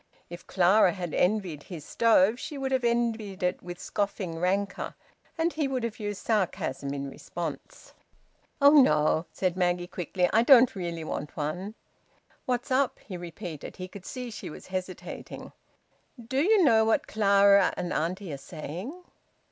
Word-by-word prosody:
If 175 Hz, -, -9 dB
Clara 185 Hz, +1 st, +4 dB
had 175 Hz, -4 st, -5 dB
envied 180 Hz, -6 st, 0 dB
his 160 Hz, -2 st, -9 dB
stove, 225 Hz, 0 st, +3 dB
she 295 Hz, +1 st, -6 dB
would 270 Hz, -1 st, -3 dB
have 260 Hz, -1 st, +1 dB
envied 230 Hz, -5 st, -1 dB
it 180 Hz, -, 0 dB
with 175 Hz, 0 st, -8 dB
scoffing 195 Hz, -5 st, -3 dB
rancour, 195 Hz, +3 st, -1 dB, 0.4 s
and 330 Hz, +1 st, +1 dB
he 305 Hz, -3 st, 0 dB
would 260 Hz, -3 st, -2 dB
have 230 Hz, -2 st, -4 dB
used 205 Hz, -2 st, -5 dB
sarcasm 180 Hz, -, -1 dB
in 140 Hz, 0 st, -4 dB
response. 160 Hz, +2 st, -7 dB, 0.7 s
"Oh 285 Hz, 0 st, +7 dB
no!" 155 Hz, -, +2 dB
said 185 Hz, -2 st, -1 dB
Maggie 175 Hz, -1 st, +1 dB
quickly. 180 Hz, 0 st, -1 dB
"I 225 Hz, -, +5 dB
don't 245 Hz, -1 st, +6 dB
really 170 Hz, -3 st, -4 dB
want 150 Hz, -1 st, -5 dB
one." 180 Hz, +8 st, -3 dB, 0.7 s
"What's 250 Hz, +1 st, -1 dB
up?" 265 Hz, +1 st, +2 dB
he 190 Hz, -, -7 dB
repeated. 175 Hz, -2 st, -7 dB
He 185 Hz, -, -6 dB
could 190 Hz, 0 st, -11 dB
see 250 Hz, -2 st, -6 dB
she 210 Hz, -, -7 dB
was -, -, -10 dB
hesitating. 185 Hz, -1 st, -6 dB, 0.7 s
"Do 260 Hz, +4 st, -1 dB
you 405 Hz, +3 st, +4 dB
know 225 Hz, -7 st, +5 dB
what 220 Hz, 0 st, +2 dB
Clara 200 Hz, -2 st, +4 dB
and 175 Hz, -, -3 dB
auntie 175 Hz, +1 st, -2 dB
are -, -, -4 dB
saying?" 180 Hz, -, -7 dB
195 Hz, 155 wpm, -28 LUFS, 175-230 Hz, 0.7 s, Oh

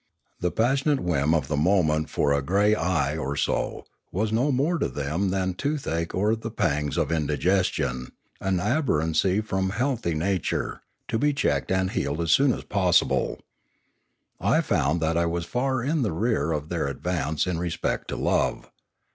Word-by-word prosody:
The 90 Hz, -, 0 dB
passionate 135 Hz, -, +1 dB
whim 80 Hz, -, +1 dB
of 75 Hz, -5 st, 0 dB
the 75 Hz, -, -1 dB
moment 80 Hz, -1 st, +2 dB
for 70 Hz, -, +1 dB
"a 70 Hz, -, +1 dB
grey 100 Hz, +8 st, +3 dB
eye 80 Hz, -9 st, 0 dB
or 70 Hz, -3 st, -3 dB
so" -, -, -1 dB, 0.3 s
was 105 Hz, +4 st, -1 dB
no 125 Hz, +6 st, +2 dB
more 150 Hz, +6 st, +1 dB
to -, -, +1 dB
them 80 Hz, +7 st, -1 dB
than 95 Hz, 0 st, 0 dB
toothache 90 Hz, -, -2 dB
or 105 Hz, +4 st, +2 dB
the 115 Hz, 0 st, -6 dB
pangs 75 Hz, -9 st, -1 dB
of -, -, 0 dB
indigestion, 75 Hz, -4 st, 0 dB, 0.3 s
an 95 Hz, -1 st, 0 dB
aberrancy 95 Hz, -, +1 dB
from 95 Hz, -3 st, -1 dB
healthy 115 Hz, -, -1 dB
nature, 90 Hz, +2 st, -1 dB, 0.3 s
to 115 Hz, -, -1 dB
be 145 Hz, +2 st, +2 dB
checked 140 Hz, -, 0 dB
and 95 Hz, 0 st, +1 dB
healed 70 Hz, -1 st, -2 dB
as 85 Hz, -1 st, 0 dB
soon 140 Hz, +6 st, +5 dB
as -, -, -4 dB
possible. 90 Hz, -4 st, +1 dB, 1.0 s
I -, -, +3 dB
found 80 Hz, +5 st, +1 dB
that 80 Hz, +1 st, +1 dB
I 85 Hz, 0 st, +2 dB
was 85 Hz, 0 st, -2 dB
far 130 Hz, +3 st, -1 dB
in 150 Hz, +3 st, 0 dB
the 110 Hz, -9 st, 0 dB
rear 85 Hz, -5 st, 0 dB
of 75 Hz, 0 st, -3 dB
their 85 Hz, -5 st, -1 dB
advance 80 Hz, +1 st, -1 dB
in 90 Hz, -3 st, -2 dB
respect 85 Hz, -1 st, -2 dB
to -, -, -4 dB
love. -, -, 0 dB
90 Hz, 170 wpm, -25 LUFS, 80-110 Hz, 1.0 s, soon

